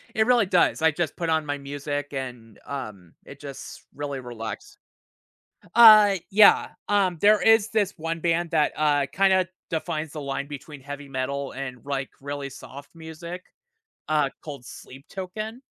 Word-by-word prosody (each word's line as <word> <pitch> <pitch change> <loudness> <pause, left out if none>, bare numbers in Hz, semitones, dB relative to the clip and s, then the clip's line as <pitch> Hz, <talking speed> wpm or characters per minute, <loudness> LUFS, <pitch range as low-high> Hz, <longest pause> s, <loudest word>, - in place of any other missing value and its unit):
It 220 0 +3
really 240 -3 +4
does. 180 -3 +2
I 160 - +5
just 160 +1 -3
put 170 -1 -3
on 160 -1 +1
my 145 0 -2
music 145 +1 -5
and, 120 -5 -7
um, 105 -11 -7
it 140 - -12
just 140 -2 -9
really 140 -1 -4
relax 115 -3 -8 1.0
Uh, 215 -4 +9
yeah. 205 +1 +6 0.2
Um, 195 -4 +2
there 210 0 +6
is 225 -1 +5
this 205 -3 0
one 165 +1 -4
band 170 0 0
that, 155 -2 +2
uh, 145 -2 +2
kinda 190 -2 +3 0.2
defines 160 -2 -3
the 155 - -6
line 140 0 -3
between 145 0 -9
heavy 145 +1 -8
metal 135 +1 -3
and, 130 -2 -7
like, 135 -2 -3
really 140 0 -5
soft 140 +3 -12
music, 165 +2 -9 0.6
uh, 150 -2 +2
called 140 -5 -8
Sleep 135 +2 -12
Token. 215 +6 -6
150 Hz, 155 wpm, -25 LUFS, 140-180 Hz, 1.0 s, Uh